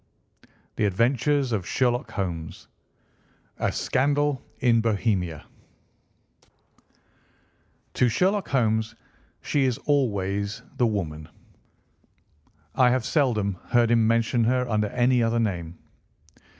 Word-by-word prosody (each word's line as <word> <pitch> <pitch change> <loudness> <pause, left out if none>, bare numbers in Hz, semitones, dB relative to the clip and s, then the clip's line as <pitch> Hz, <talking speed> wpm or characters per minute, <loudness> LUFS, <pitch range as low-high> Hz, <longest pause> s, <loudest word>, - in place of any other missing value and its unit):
The 105 - +1
Adventure 120 +9 +2
of 135 - -3
the 110 - +1
Copper 120 +6 0
Beeches 85 -5 -6 0.9
I. - - +1
A - - 0
SCANDAL 145 0 0 0.2
IN 115 -2 +3
BOHEMIA 100 -8 -1
I. - - -35 1.5
To 125 - +2
Sherlock 190 - +1
Holmes 110 -4 0 0.5
she 140 -2 +1
is 125 -3 0
always 100 -7 -1
the 125 -2 +3
woman. 80 -8 -4 1.4
I 125 -1 +4
have 125 -2 0
seldom 110 - 0
heard 120 -1 +3
him 115 -2 +3
mention 115 +1 +2
her 125 +1 +1
under 105 -2 0
any 125 +3 +2
other 115 0 +1
name. 90 -6 -3
115 Hz, 110 wpm, -25 LUFS, 100-130 Hz, 1.5 s, I